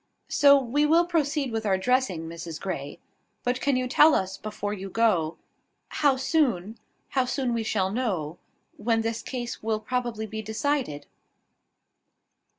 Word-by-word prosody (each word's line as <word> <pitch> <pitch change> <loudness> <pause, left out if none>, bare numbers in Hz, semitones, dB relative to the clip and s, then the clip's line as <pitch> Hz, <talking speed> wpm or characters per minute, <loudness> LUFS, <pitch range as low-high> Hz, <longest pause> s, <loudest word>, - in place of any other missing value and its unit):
So 280 -1 +6
we 270 +3 0
will 335 +3 +5
proceed 300 -5 0
with 225 0 -2
our 195 -3 +2
dressing, 195 -7 0
Mrs 165 -1 -7
Grey. 145 -7 -5 0.5
But 250 +1 -1
can 280 -2 +2
you 255 0 0
tell 300 +4 +6
us, 190 0 -1
before 210 -1 -4
you 195 -1 -6
go, 185 -7 +1 0.5
how 285 -3 +2
soon 245 - 0 0.3
How 260 -2 +1
soon 255 -1 -1
we 230 - 0
shall 195 -4 0
know; 185 -9 -2 0.4
when 225 +1 +1
this 225 0 -2
case 245 -2 -5
will 220 0 -1
probably 240 -2 -2
be 220 0 -5
decided?" 220 - -2
230 Hz, 150 wpm, -26 LUFS, 195-260 Hz, 0.5 s, So